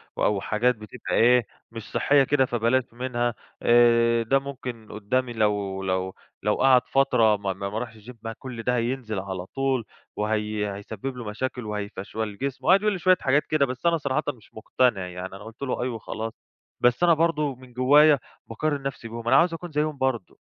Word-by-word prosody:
و - - -2
أو 100 -2 +2
حاجات 125 +4 +1
بتبقى 110 +2 -7
إيه، 120 0 +5 0.3
مش 115 -2 -9
صحّية 140 -1 +4
كده، 135 0 +2
فبلاش 120 +1 +1
منها. 120 -1 -1 0.3
آآ 115 -1 +4
ده 135 +5 +2
ممكن 125 -5 -7
قُدّام 125 +5 -1
لو 105 -4 -1
لو 95 0 -2 0.3
لو 105 - +2
قعد 130 -2 +5
فترة 115 -6 +3
ما 100 -1 -2
ما 100 +1 -5
ما 105 +2 -3
رَاحش 115 -1 -6
الgym 125 - -9
ما 115 0 -4
كل 125 -3 -7
ده 125 +2 +1
هينزل 120 -3 -2
على 95 -1 -5
طول 135 +1 -1 0.3
وهي 105 -1 -1
هيسبِّب 110 +6 -6
له 120 - -6
مشاكل 125 +3 -4
وهيفَشْوَل 105 0 -5
جسمه." 140 +1 -4
وقعد 190 +3 +6
يقول 210 -1 +1
لي 190 - -4
شوية 185 +1 +4
حاجات 140 +3 +2
كده، 155 -3 +3
بس 130 +3 -7
أنا 170 -1 +4
صراحةً 145 0 -1
مش 120 -6 -9
مُقتنع 110 -3 0
يعني 90 +1 -6
أنا 95 - -10
قُلت 110 +2 -12
له: 135 -3 -2
"أَي" 125 - 0
وخلاص. 115 -1 -5 0.5
بس 125 +6 +3
أنا 175 -1 +6
برضه 150 -4 +1
من 125 0 -16
جوّايا 145 +4 +5 0.3
باقارن 145 +5 -2
نَفْسي 135 -4 -5
بيهم، 115 0 -7
أنا 130 - +5
عاوز 165 +5 +4
أكون 170 +1 -7
زيّهم 150 0 -1
برضه. 130 -7 -2
120 Hz, 195 wpm, -25 LUFS, 110-135 Hz, 0.5 s, وقعد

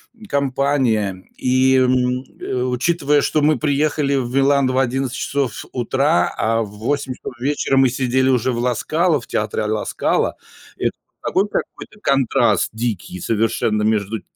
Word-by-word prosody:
м, 220 -2 -14
компания. 130 - 0
И, 130 +1 +3
м, 125 0 +2 0.2
э, 125 -1 -2
учитывая, 145 +3 +1
что 155 - +1
мы 150 0 +3
приехали 145 0 +1
в 125 -2 -2
Милан 140 0 +3
в 130 0 -1
11 130 0 0
часов 135 -6 -2
утра, 125 -5 +1
а 115 +1 +1
в 105 - -8
8 135 +4 -2
часов - - -8
вечера 135 +1 0
мы 135 -1 +5
сидели 130 +1 +1
уже 130 -1 +2
в 120 - -3
"Ла 125 0 +1
Скала", 165 +6 +1
в - - -14
театре 110 +1 -2
"ала 105 0 -1
Скала"- - - 0 0.4
это - - 0 0.3
такой 195 +2 +1
какой-то 210 +1 -5
контраст 130 - +2
дикий 110 -5 -4
совершенно 110 +1 0
между, 105 0 0
э, - - -12
130 Hz, 160 wpm, -20 LUFS, 115-140 Hz, 0.4 s, мы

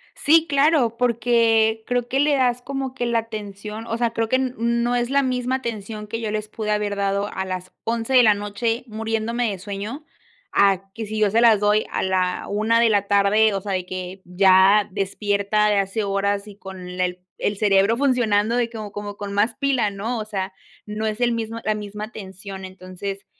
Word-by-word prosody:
Sí, 320 +2 +4
claro, 280 -5 +3
porque 230 -2 +2
creo 245 -1 0
que 265 +2 0
le 290 0 +3
das 250 -2 +1
como 270 -1 -4
que 245 -2 -3
la 235 -1 +1
atención, 215 0 -7
o 230 - -2
sea, 235 -1 0
creo 225 -1 -2
que 260 - +2
n 260 -1 0
no 235 +1 +1
es 240 0 0
la 280 0 +3
misma 255 0 -1
atención 215 -4 -5
que 225 +2 -4
yo 220 -2 -3
les 215 0 -3
pude 215 0 -4
haber 210 -1 0
dado 200 0 0
a 190 - -3
las 185 -1 -5
11 230 +2 -1
de 255 - +8
la 215 - +6
noche, 205 +3 -2
muriéndome 225 +1 -2
de 195 - -5
sueño, 205 - -6 0.5
a 195 -1 +2
que 225 - -5
si 215 +1 -5
yo 210 -2 +2
se 225 - +3
las 225 -3 +6
doy 210 +1 +3
a - - -1
la 185 -1 0
1 220 +3 +2
de 235 - +4
la 205 -2 +1
tarde, 205 +2 +4
o 195 - -2
sea, 205 - -5
de 185 -1 -1
que, 185 +1 -6
ya 190 +3 +5
despierta 200 +2 0
de 205 - +2
hace 195 +2 0
horas 200 +1 -1
y 200 - -12
con 190 -2 -9
el 180 0 -2 0.2
el 205 - -1
cerebro 205 +2 +3
funcionando 235 -5 +2
de 240 -1 +1
como 215 -3 -7
como, 205 0 -6
con 200 -1 -5
más 205 +3 +1
pila, 270 -6 +1
¿no?, 220 +4 -3
o 215 - -4
sea, 195 -3 -4 0.3
no 215 +1 -3
es 215 +1 -3
el 240 0 +3
mismo 230 0 -3
la 215 - +2
misma 210 0 -6
atención, 195 -3 -8
entonces, 185 +1 -7
215 Hz, 210 wpm, -22 LUFS, 200-235 Hz, 0.5 s, de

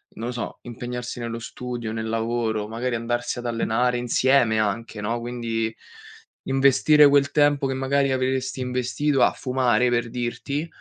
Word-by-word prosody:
non 115 +2 -5
lo - - -2
so, 120 - -5
impegnarsi 125 0 -6
nello 115 0 -4
studio, 120 -1 -6
nel 110 0 -4
lavoro, 115 -2 -1
magari 120 +2 -2
andarsi 120 +1 -2
ad 120 - -8
allenare 120 +1 +1
insieme 120 -2 +2
anche, 110 +1 -2
no, 115 +3 -2
quindi 115 -2 -3 0.7
investire 140 +3 +5
quel 140 0 +4
tempo 145 -2 +3
che 135 - -2
magari 135 +1 +1
avresti 130 0 -1
investito 125 +2 0
a - - +5
fumare, 125 -1 +1
per 120 -1 0
dirti, 135 +6 -3
120 Hz, 150 wpm, -24 LUFS, 115-130 Hz, 0.7 s, investire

